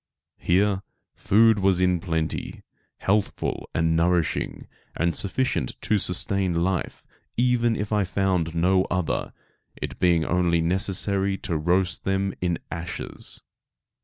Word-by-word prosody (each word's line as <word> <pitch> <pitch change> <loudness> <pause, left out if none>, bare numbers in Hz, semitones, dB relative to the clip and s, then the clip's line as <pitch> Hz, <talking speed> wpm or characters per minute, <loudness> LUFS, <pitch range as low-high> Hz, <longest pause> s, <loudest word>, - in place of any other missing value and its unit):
Here 95 +2 +2 0.3
food 110 +1 +4
was 95 -2 +3
in 90 -1 +2
plenty, 80 -3 -3 0.3
healthful 100 +1 -1
and 80 0 +1
nourishing, 85 0 0 0.3
and 85 0 +1
sufficient 100 - -1
to 105 - +1
sustain 90 -2 +1
life 95 -1 -2 0.3
even 120 -1 +2
if 105 0 -4
I 105 -1 +3
found 90 -3 0
no 95 +3 +3
other, 90 -3 -2 0.5
it - - -6
being 85 -3 +3
only 85 -1 +2
necessary 95 +3 +1
to 85 - -1
roast 90 +4 0
them 95 0 0
in 85 -2 0
ashes. 85 +1 -4
90 Hz, 120 wpm, -25 LUFS, 85-100 Hz, 0.5 s, food